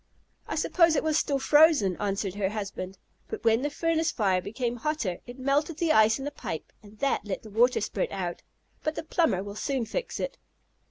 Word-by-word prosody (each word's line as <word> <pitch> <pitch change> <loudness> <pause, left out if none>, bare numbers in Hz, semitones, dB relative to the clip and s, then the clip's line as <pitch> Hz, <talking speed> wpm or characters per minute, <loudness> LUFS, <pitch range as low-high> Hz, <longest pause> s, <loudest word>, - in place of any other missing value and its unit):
"I - - -3
suppose 335 -3 +3
it - - +1
was 315 -1 +2
still 280 - 0
frozen," 295 - +5
answered 200 -1 -1
her 200 -1 -1
husband. 195 -2 -5 0.3
"But 440 - -6
when 225 +1 +4
the 290 - 0
furnace 325 +2 0
fire 190 -5 +1
became 240 +4 -3
hotter 235 - -2
it 245 +1 -9
melted 285 +4 0
the 330 -2 +2
ice 220 -4 +5
in 270 - -6
the 290 - -3
pipe 160 - -6
and 210 0 -16
that 275 +4 0
let 200 -2 -4
the 215 - -11
water 240 +4 +3
spurt 200 -2 -2
out. 180 -3 -4 0.4
But 310 0 -2
the - - -4
plumber 320 - +1
will 200 0 -7
soon 250 +3 -2
fix 480 - -4
it." - - -4
245 Hz, 205 wpm, -28 LUFS, 200-305 Hz, 0.4 s, frozen